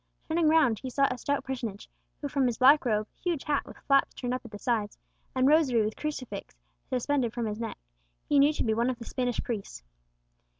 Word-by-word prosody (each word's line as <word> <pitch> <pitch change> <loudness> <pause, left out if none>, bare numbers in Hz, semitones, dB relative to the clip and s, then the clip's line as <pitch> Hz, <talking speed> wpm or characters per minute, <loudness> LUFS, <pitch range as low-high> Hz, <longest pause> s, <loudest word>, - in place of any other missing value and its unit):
Turning 325 0 +2
round, 305 -9 +4
he 260 - -5
saw 275 +2 +2
a 250 - -3
stout 285 +2 -1
personage, 235 -6 -5 0.3
who 290 - -2
from 275 -2 +1
his 235 -3 -1
black 275 +3 +6
robe, 215 -2 +1 0.2
huge 345 -6 -1
hat 290 -1 0
with - - -11
flaps 275 -1 +3
turned 245 -1 -3
up 255 - -3
at 235 - -10
the 210 - -8
sides, 215 -3 -1 0.4
and 260 0 +3
rosary 275 -7 +4
with 215 - -3
crucifix 255 -9 -5 0.3
suspended 255 -1 0
from 240 -1 -2
his 210 0 -3
neck, 230 -1 -4 0.5
he 290 - +4
knew 285 +2 +6
to 310 - -2
be 220 - +1
one 235 +3 +1
of 255 - -2
the 230 - -9
Spanish 245 -1 -2
priests. 205 - -5
255 Hz, 215 wpm, -28 LUFS, 230-285 Hz, 0.5 s, black